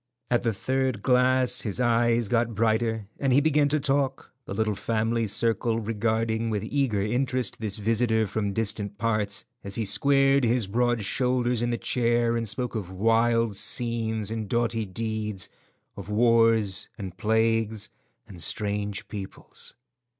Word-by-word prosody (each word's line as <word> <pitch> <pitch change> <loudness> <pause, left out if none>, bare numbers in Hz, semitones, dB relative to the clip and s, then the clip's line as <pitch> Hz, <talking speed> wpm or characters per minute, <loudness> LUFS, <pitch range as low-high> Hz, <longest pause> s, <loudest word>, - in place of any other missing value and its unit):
At 120 - +3
the 115 - +1
third 130 0 -1
glass 125 0 +3
his 105 +1 -3
eyes 120 -1 +2
got 115 0 0
brighter, 110 0 0
and 135 -2 +1
he 130 - +6
began 150 -1 +3
to 150 +1 +1
talk, 135 -1 -1
the - - -6
little 110 0 0
family 115 +2 -1
circle 115 +2 0
regarding 115 +1 -1
with 105 -3 -2
eager 130 -8 0
interest 125 +1 -1
this 110 -2 -2
visitor 110 +1 +1
from 105 0 -2
distant 105 -1 -3
parts, 105 -2 -1 0.2
as 100 0 -5
he 115 - -1
squared 135 +4 +3
his 120 -1 +2
broad 120 +2 0
shoulders 125 0 0
in 120 - 0
the 120 - -1
chair 120 -1 +1
and 115 -2 0
spoke 125 +3 -2
of 105 -6 -4
wild 115 +2 +2
scenes 110 -1 -1
and 110 -3 -4
doughty 115 -2 0
deeds; 105 -1 -3 0.5
of - - -9
wars 115 -2 +3
and 95 -4 -7
plagues 110 -1 0 0.4
and 90 -5 -9
strange 105 0 -1
peoples. 100 -3 -8
115 Hz, 150 wpm, -26 LUFS, 105-120 Hz, 0.5 s, he